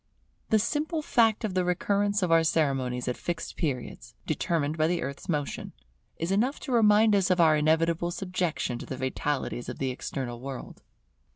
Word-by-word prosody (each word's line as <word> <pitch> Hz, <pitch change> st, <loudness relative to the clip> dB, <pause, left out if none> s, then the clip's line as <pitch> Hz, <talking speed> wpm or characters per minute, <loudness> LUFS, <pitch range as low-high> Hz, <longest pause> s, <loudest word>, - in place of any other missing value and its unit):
The 220 Hz, -, +5 dB
simple 305 Hz, -, -1 dB
fact 225 Hz, -5 st, +3 dB
of 205 Hz, -, -3 dB
the 185 Hz, 0 st, +1 dB
recurrence 200 Hz, +3 st, +1 dB
of 175 Hz, -, +1 dB
our 165 Hz, 0 st, +5 dB
ceremonies 135 Hz, -6 st, 0 dB
at 125 Hz, -, 0 dB
fixed 175 Hz, -1 st, -4 dB
periods, 125 Hz, -7 st, -4 dB
determined 155 Hz, -1 st, -1 dB
by 155 Hz, 0 st, +2 dB
the 175 Hz, 0 st, 0 dB
Earth's 140 Hz, +5 st, -6 dB
motion, 145 Hz, -4 st, -2 dB, 0.4 s
is 165 Hz, +3 st, -2 dB
enough 240 Hz, +8 st, +1 dB
to 270 Hz, -, -5 dB
remind 215 Hz, -2 st, +5 dB
us 195 Hz, -2 st, +2 dB
of 185 Hz, -1 st, +2 dB
our 160 Hz, -2 st, +6 dB
inevitable 160 Hz, +3 st, +2 dB
subjection 175 Hz, -9 st, -2 dB
to -, -, -8 dB
the 130 Hz, -, -5 dB
fatalities 130 Hz, -1 st, -2 dB
of -, -, -6 dB
the 130 Hz, -1 st, -1 dB
External 125 Hz, -1 st, -5 dB
World. 135 Hz, 0 st, -8 dB
165 Hz, 175 wpm, -28 LUFS, 140-200 Hz, 0.4 s, our